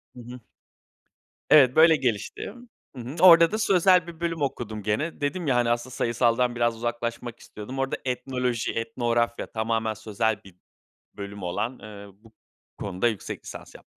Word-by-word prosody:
Hı - - -11
hı. 125 +1 -10 1.1
Evet, 130 -4 +6
böyle 160 0 +7
gelişti. 125 - -3 0.4
Hı 125 - -7
hı. 130 +6 -7
Orada 170 -1 +8
da 215 - -1
sözel 185 -3 +4
bir 165 -2 -10
bölüm 165 -2 -3
okudum 115 -6 -3
gene. 140 +11 -2
Dedim 165 +4 -2
ya, 130 - +2
hani, 120 -1 +2
aslında 120 +2 -2
sayısaldan 120 +1 +1
biraz 120 -1 +1
uzaklaşmak 120 0 -4
istiyordum. 125 +6 -9
Orada 135 0 -1
etnoloji, 125 -2 -2
etnografya 115 +1 -1
tamamen 110 0 -1
sözel 110 +1 -2
bir 95 -2 -16 0.6
bölüm 100 -1 -7
olan, 115 +8 -3
eee, 100 -1 -11 0.2
bu 115 -1 -19 0.4
konuda 100 +3 -1
yüksek 110 -4 -5
lisans - - -10
yaptım. - - -14
120 Hz, 155 wpm, -25 LUFS, 110-135 Hz, 1.1 s, Orada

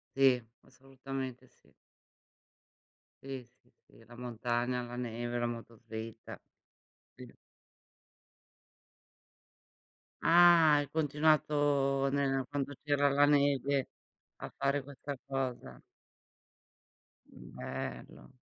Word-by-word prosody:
Sì, 135 -2 +4 0.2
assolutamente, 135 -1 -7
sì. - - -29 1.5
Sì, 135 -2 -6 0.2
sì, 125 - -31 0.2
sì, 115 - -20
la 120 - -14
montagna, 120 +1 -2
la 120 0 -7
neve, 120 0 -3
la 120 - 0
motoslitta. 115 -1 -8 0.8
Sì. - - -12 2.9
Ah, 170 -2 +7
hai 145 -2 -1
continuato 145 -2 +2
nel 135 -2 0
quando 145 -1 -3
c'era 145 -1 +2
la 145 +1 +4
neve 140 -2 +2 0.5
a - - -7
fare 140 +1 +1
questa 140 +1 -7
cosa. 135 -2 -4 1.5
Bello. 60 - -8
135 Hz, 85 wpm, -32 LUFS, 120-145 Hz, 2.9 s, Ah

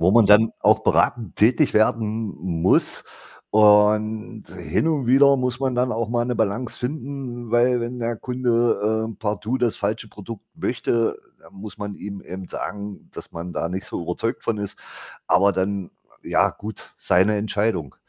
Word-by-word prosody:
wo 90 +3 +4
man 115 0 +5
dann 105 +2 +6
auch - - +4
beratend 115 -6 +1
tätig 115 +3 +3
werden 110 0 +1
m 85 -2 -3
muss. 90 - +2 0.5
Und 105 +1 +3
hin 160 - -1
und 145 -6 0
wieder 140 +2 +6
muss 125 0 -2
man 130 -2 -1
dann 125 -1 +1
auch 115 0 -2
mal 120 0 0
'ne 125 0 -2
Balance 110 +2 -2
finden, 125 -3 -5
weil 120 +1 +3
wenn 120 +1 -5
der 115 0 -2
Kunde, 115 -3 0
äh, - - -13
partout 105 +4 -2
das 120 -3 0
falsche 105 +1 -3
Produkt 105 +1 -10
möchte, 115 -1 0 0.2
dann - - -19
muss 105 +2 -10
man 100 0 -5
ihm 100 0 -8
eben 95 0 -8
sagen, 100 -1 -6
dass - - -10
man 85 +1 -7
da 85 - -2
nicht 95 +2 -4
so - - -5
überzeugt 90 +7 -3
von 115 -2 -1
ist. 100 -1 -5 0.5
Aber 100 +1 +4
dann, 95 -1 -2 0.3
ja - - +2
gut, 105 0 -10
seine 95 +4 +3
Entscheidung. 105 - -1
110 Hz, 170 wpm, -22 LUFS, 100-120 Hz, 0.5 s, dann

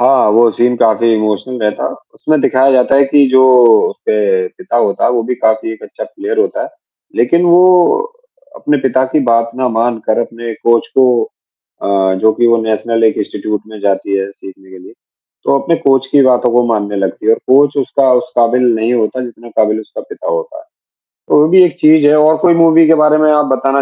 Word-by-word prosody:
हाँ, 130 -2 +3
वो 115 +1 +3
सीन 120 +4 -1
काफ़ी 115 0 +1
इमोशनल 110 +4 -3
रहता, 105 0 -2 0.3
उसमें 155 -1 -1
दिखाया 135 +1 +2
जाता 130 +1 +2
है 140 - +4
कि 140 0 +3
जो 130 0 +4 0.5
उसके 100 -3 -1
पिता 180 -9 -6
होता 100 -4 0
है, - - +2
वो 120 -2 -1
भी 125 +2 -4
काफ़ी 110 0 -1
एक 110 - -13
अच्छा - - -9
प्लेयर 435 +1 -6
होता 375 -8 -1
है। - - -7 0.5
लेकिन 145 +9 +1
वो 180 - +4 0.6
अपने 150 - -1
पिता 130 0 0
की 155 - +1
बात 115 0 +1
ना 130 -1 -1
मान 115 0 -2
कर, 110 - +1
अपने 115 0 -6
कोच 115 +1 0
को 130 - +5 0.8
अ, 95 -1 0
जो 110 - +3
कि 120 - 0
वो 115 0 +3
नेशनल 110 +1 -2
एक 110 - +1
इंस्टीट्यूट 105 0 -4
में 110 -1 -12
जाती 100 0 -2
है 95 0 -4
सीखने 95 -1 -15
के 95 - -12
लिए। 90 - -15 0.5
तो 140 - +2
अपने 165 - -1
कोच 135 -3 0
की 145 - +4
बातों 125 -1 +1
को 120 +1 +2
मानने 105 -3 -2
लगती 95 +1 -4
है - - +5
और - - -4
कोच 140 +2 +3
उसका 135 0 0
उस 125 +6 -1
काबिल 120 +2 +2
नहीं 110 +2 -1
होता, 120 +2 -2
जितना 120 0 -13
काबिल 110 0 +1
उसका 110 - -10
पिता 425 +3 -8
होता 485 -8 -5
है, - - -15 0.6
तो - - +3
वो 155 - +3
भी 185 +1 +5
एक 175 0 -1
चीज़ 155 -2 +4
है 150 - +4
और 155 +1 +3
कोई 170 +1 +2
मूवी 165 0 +4
के 165 - +4
बारे 150 0 +3
में 155 0 +2
आप 150 -1 +2
बताना 135 +1 -1
125 Hz, 215 wpm, -12 LUFS, 110-150 Hz, 0.8 s, को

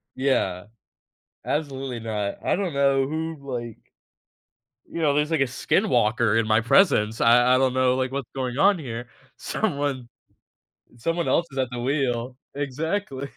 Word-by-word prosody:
Yeah. 100 -9 0 0.8
Absolutely 135 -5 -3
not. 105 -3 -4
I - - +2
don't 185 -5 -2
know 135 -1 +3
who, 160 +2 -3
like 120 -5 -6 1.1
you 170 - -6
know, 150 -3 +3
there's, 150 +2 0
like, 160 - +2
a 135 - +3
skin 125 - 0
walker 110 0 +2
in 115 -1 +2
my 110 0 +4
presence, 115 - +3
I 120 +2 +5
I - - +4
don't 130 -1 +2
know, 130 -1 +2
like, 130 0 -1
what's 135 -3 -4
going 130 -1 -3
on 195 +5 +4
here. 120 -5 -6 0.3
Someone 140 - -2 0.9
someone 165 +8 -1
else 170 - +2
is 135 - -6
at 130 -2 0
the 125 - -5
wheel. 125 -2 -1 0.2
Exactly, 145 +1 -3
130 Hz, 155 wpm, -24 LUFS, 120-145 Hz, 1.1 s, I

